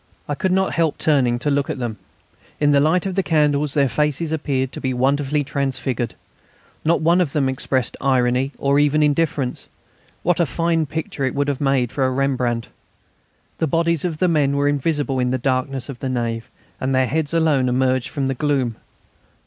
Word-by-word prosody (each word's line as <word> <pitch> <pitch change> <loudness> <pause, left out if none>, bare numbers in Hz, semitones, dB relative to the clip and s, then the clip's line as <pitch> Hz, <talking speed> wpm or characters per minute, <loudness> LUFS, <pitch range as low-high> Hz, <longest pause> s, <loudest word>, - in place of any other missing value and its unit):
I 145 - -1
could 185 +6 -1
not 190 +1 +1
help 165 -2 +1
turning 130 -6 +2
to 145 +5 -1
look 140 0 0
at - - -2
them. 120 -4 -4 0.6
In 145 -1 +3
the 140 - +5
light 160 +6 +2
of 190 - -2
the 195 - +1
candles 150 -4 +1
their 140 -2 +4
faces 150 +4 -1
appeared 135 -4 -1
to - - -7
be 130 -1 -1
wonderfully 140 +3 +1
transfigured. 130 -4 -2 0.7
Not 165 +2 +2
one 170 +3 +4
of 155 -6 -1
them 140 -3 +1
expressed 130 -1 -1
irony 130 0 +2
or 140 +1 +2
even 150 +1 +3
indifference. 145 -3 0 0.6
What 175 0 +2
a 170 - +3
fine 165 +1 0
picture 155 -1 -4
it 130 - -1
would 140 0 0
have 140 -1 -2
made 135 -4 +1
for 135 - -1
a 130 - +3
Rembrandt! 125 -3 -1 0.9
The 160 - +1
bodies 165 +1 +1
of 170 -4 -2
the 185 - +2
men 145 -4 +2
were 145 0 +2
invisible 145 -1 0
in 125 0 +1
the 130 - 0
darkness 130 0 -1
of 135 -4 -8
the 135 - -3
nave, 115 -1 -2 0.3
and 130 0 0
their 130 0 +3
heads 150 +3 -1
alone 155 -6 +2
emerged 130 0 +1
from 140 -2 -2
the 135 - 0
gloom. 135 -4 -1
140 Hz, 195 wpm, -21 LUFS, 130-155 Hz, 0.9 s, the